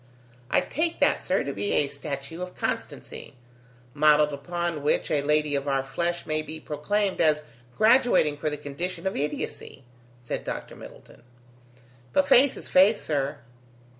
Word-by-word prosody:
"I -, -, +3 dB
take 325 Hz, +3 st, -2 dB
that, -, -, +3 dB
sir, -, -, 0 dB
to -, -, -4 dB
be 205 Hz, -, -2 dB
a 145 Hz, -, +2 dB
statue 140 Hz, +3 st, -6 dB
of 180 Hz, 0 st, -6 dB
constancy, -, -, -5 dB, 0.6 s
modelled 150 Hz, 0 st, +4 dB
upon 170 Hz, +2 st, -3 dB
which 150 Hz, -, 0 dB
a 145 Hz, -, +2 dB
lady 150 Hz, +1 st, +1 dB
of 140 Hz, 0 st, -1 dB
our 135 Hz, -1 st, +1 dB
flesh 170 Hz, +6 st, -2 dB
may 155 Hz, 0 st, -1 dB
be 155 Hz, +1 st, -8 dB
proclaimed 195 Hz, +7 st, -1 dB
as 150 Hz, -1 st, +3 dB, 0.3 s
graduating 220 Hz, -, +4 dB
for 150 Hz, -, -1 dB
the 150 Hz, -, -4 dB
condition 150 Hz, +7 st, -5 dB
of 190 Hz, -, -1 dB
idiocy," 145 Hz, -1 st, -4 dB, 0.4 s
said 120 Hz, -, -5 dB
Dr. -, -, -6 dB
Middleton. -, -, -14 dB, 0.9 s
"But 190 Hz, -, +3 dB
faith 260 Hz, +7 st, +5 dB
is -, -, -8 dB
faith, 200 Hz, +4 st, +5 dB
sir." 140 Hz, -4 st, -2 dB
155 Hz, 155 wpm, -26 LUFS, 145-185 Hz, 0.9 s, faith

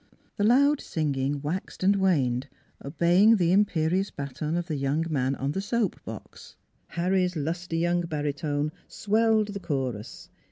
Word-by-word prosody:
The 205 Hz, -, 0 dB
loud 280 Hz, +6 st, +4 dB
singing 140 Hz, -2 st, -2 dB
waxed 175 Hz, +5 st, -4 dB
and 200 Hz, +2 st, +4 dB
waned, 140 Hz, -10 st, +1 dB, 0.4 s
obeying 175 Hz, +9 st, +4 dB
the 175 Hz, -4 st, +2 dB
imperious 185 Hz, -1 st, +2 dB
baton 145 Hz, +4 st, -4 dB
of 175 Hz, -, -2 dB
the 160 Hz, -3 st, -3 dB
young 140 Hz, +4 st, 0 dB
man 135 Hz, -2 st, 0 dB
on 135 Hz, +1 st, -2 dB
the 195 Hz, -, -2 dB
soap 225 Hz, +1 st, -1 dB
box. -, -, -10 dB, 0.3 s
Harry's 180 Hz, +1 st, 0 dB
lusty 165 Hz, +3 st, -3 dB
young 175 Hz, +1 st, +1 dB
baritone 145 Hz, -1 st, -2 dB, 0.2 s
swelled 220 Hz, 0 st, +1 dB
the 200 Hz, -1 st, -5 dB
chorus. 130 Hz, -, -4 dB
170 Hz, 145 wpm, -26 LUFS, 145-195 Hz, 0.4 s, loud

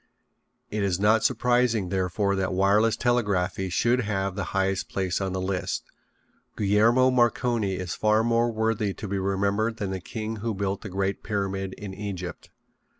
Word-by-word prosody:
It 105 Hz, -, -1 dB
is 95 Hz, -2 st, 0 dB
not 110 Hz, +2 st, +4 dB
surprising, 120 Hz, -5 st, +2 dB
therefore, 95 Hz, +2 st, 0 dB
that 95 Hz, -1 st, -1 dB
wireless 105 Hz, +4 st, +3 dB
telegraphy 100 Hz, -6 st, 0 dB
should 120 Hz, +7 st, +2 dB
have 100 Hz, -3 st, -1 dB
the 100 Hz, -, -3 dB
highest 95 Hz, 0 st, 0 dB
place 95 Hz, 0 st, -1 dB
on 95 Hz, -1 st, -1 dB
the 95 Hz, -, -2 dB
list. 95 Hz, 0 st, -2 dB, 0.7 s
Guglielmo 115 Hz, +6 st, +4 dB
Marconi 120 Hz, -4 st, +1 dB
is 90 Hz, -2 st, -4 dB
far 110 Hz, +1 st, +2 dB
more 115 Hz, 0 st, +2 dB
worthy 110 Hz, -2 st, 0 dB
to 105 Hz, -, -6 dB
be 100 Hz, 0 st, -2 dB
remembered 100 Hz, +4 st, 0 dB
than 100 Hz, -3 st, -3 dB
the 95 Hz, -1 st, -4 dB
king 110 Hz, +3 st, -5 dB
who 110 Hz, 0 st, -3 dB
built 100 Hz, 0 st, -2 dB
the 105 Hz, -, -7 dB
great 95 Hz, +1 st, -2 dB
Pyramid 95 Hz, -2 st, -2 dB
in 100 Hz, -2 st, -8 dB
Egypt. 95 Hz, -3 st, -6 dB
100 Hz, 160 wpm, -26 LUFS, 95-110 Hz, 0.7 s, not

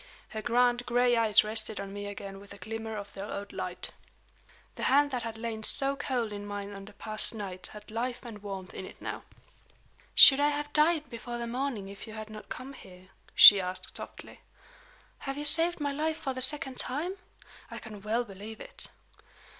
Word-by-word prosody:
Her 215 Hz, 0 st, -5 dB
grand 245 Hz, +1 st, +2 dB
gray 245 Hz, 0 st, +3 dB
eyes 220 Hz, -2 st, +5 dB
rested 215 Hz, 0 st, -1 dB
on 195 Hz, 0 st, -6 dB
me 205 Hz, 0 st, -6 dB
again 200 Hz, -1 st, -8 dB
with 200 Hz, 0 st, -12 dB
a -, -, -13 dB
glimmer 220 Hz, +1 st, -6 dB
of 205 Hz, -, -8 dB
their 195 Hz, +1 st, -6 dB
old 200 Hz, 0 st, -6 dB
light. -, -, -5 dB, 0.8 s
The -, -, -10 dB
hand 285 Hz, +2 st, +4 dB
that 250 Hz, -2 st, -2 dB
had 225 Hz, -1 st, -6 dB
lain 225 Hz, -1 st, -4 dB
so 275 Hz, +5 st, +3 dB
cold 245 Hz, -6 st, -2 dB
in 205 Hz, 0 st, -6 dB
mine 205 Hz, 0 st, -6 dB
on 195 Hz, 0 st, -9 dB
the 210 Hz, -, -13 dB
past 215 Hz, +2 st, -1 dB
night 190 Hz, -3 st, -5 dB
had 210 Hz, 0 st, -12 dB
life 245 Hz, +2 st, -3 dB
and 215 Hz, -4 st, -9 dB
warmth 195 Hz, -2 st, -7 dB
in 190 Hz, -, -7 dB
it -, -, -14 dB
now. -, -, -5 dB, 0.9 s
"Should 270 Hz, 0 st, +9 dB
I 290 Hz, +1 st, +4 dB
have 295 Hz, 0 st, -4 dB
died 305 Hz, 0 st, +3 dB
before 240 Hz, +1 st, -6 dB
the 235 Hz, -, -4 dB
morning 240 Hz, -4 st, -3 dB
if 200 Hz, +2 st, -10 dB
you 220 Hz, -, -9 dB
had 215 Hz, 0 st, -8 dB
not 215 Hz, 0 st, -10 dB
come 260 Hz, +2 st, -7 dB
here?" 185 Hz, -6 st, -15 dB, 0.3 s
she 200 Hz, -2 st, +11 dB
asked, 185 Hz, 0 st, -6 dB
softly. -, -, -8 dB, 0.8 s
"Have 275 Hz, 0 st, -5 dB
you 295 Hz, -, -4 dB
saved 335 Hz, +3 st, +6 dB
my 285 Hz, -1 st, -1 dB
life 310 Hz, +3 st, -1 dB
for 285 Hz, -5 st, -3 dB
the 255 Hz, -, -5 dB
second 265 Hz, -1 st, +2 dB
time? 330 Hz, +9 st, -3 dB, 0.5 s
I -, -, -8 dB
can 215 Hz, -3 st, -10 dB
well 220 Hz, +4 st, 0 dB
believe 210 Hz, +2 st, -10 dB
it." -, -, -3 dB
225 Hz, 200 wpm, -29 LUFS, 205-265 Hz, 0.9 s, she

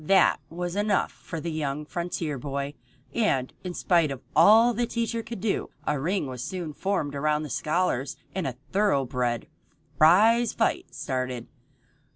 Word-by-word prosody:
That 190 Hz, +5 st, +4 dB
was 175 Hz, +2 st, -4 dB
enough 205 Hz, 0 st, +1 dB
for 165 Hz, -, -7 dB
the 170 Hz, +2 st, -4 dB
young 150 Hz, -1 st, -2 dB
frontier 165 Hz, -4 st, -3 dB
boy, 140 Hz, +1 st, -3 dB, 0.4 s
and, 135 Hz, -, +1 dB
in 180 Hz, -1 st, -5 dB
spite 170 Hz, -4 st, +3 dB
of 135 Hz, -1 st, -6 dB
all 225 Hz, +3 st, +7 dB
the 240 Hz, +1 st, 0 dB
teacher 230 Hz, 0 st, -1 dB
could 230 Hz, -1 st, -7 dB
do, 215 Hz, -1 st, -1 dB, 0.2 s
a 150 Hz, -2 st, 0 dB
ring 180 Hz, +5 st, 0 dB
was 125 Hz, -2 st, -5 dB
soon 165 Hz, 0 st, -4 dB
formed 190 Hz, -3 st, -1 dB
by 150 Hz, +2 st, +1 dB
the 150 Hz, -3 st, -5 dB
scholars 155 Hz, -5 st, 0 dB, 0.2 s
and 185 Hz, -5 st, -2 dB
a 130 Hz, -, -4 dB, 0.2 s
thoroughbred 130 Hz, -, +1 dB, 0.5 s
prize 215 Hz, +9 st, +6 dB
fight -, -, -1 dB
started. 130 Hz, -2 st, -3 dB
165 Hz, 155 wpm, -26 LUFS, 140-200 Hz, 0.5 s, all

